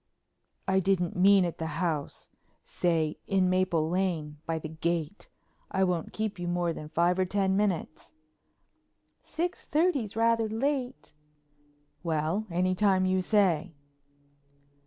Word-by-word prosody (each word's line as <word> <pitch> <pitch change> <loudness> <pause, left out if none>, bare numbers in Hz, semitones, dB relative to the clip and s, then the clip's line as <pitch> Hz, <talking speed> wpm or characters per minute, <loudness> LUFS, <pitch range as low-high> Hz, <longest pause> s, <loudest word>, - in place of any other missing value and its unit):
"I 190 0 +3
didn't 180 -2 0
mean 190 +1 +5
at 170 - -5
the 160 - -2
house. 160 -5 -3 0.3
Say 160 -3 0
in 185 -2 +2
Maple 180 -4 +1
Lane, 165 -4 -2
by 165 0 -1
the 155 - -5
gate. 165 +3 -3 0.4
I 190 - +1
won't 180 -3 -1
keep 215 -3 -3
you 175 - -3
more 175 -1 0
than 150 -1 -8
five 175 +3 +2
or 185 - +3
ten 190 0 +1
minutes." 195 -6 -2 1.1
"Six 350 +2 -4
thirty's 295 - +1
rather 230 -1 +2
late." 260 +3 -2 0.9
"Well, 165 +5 -1
any 180 +2 +1
time 190 -1 +2
you 185 0 +2
say." 180 -5 +1
185 Hz, 130 wpm, -28 LUFS, 165-200 Hz, 1.1 s, mean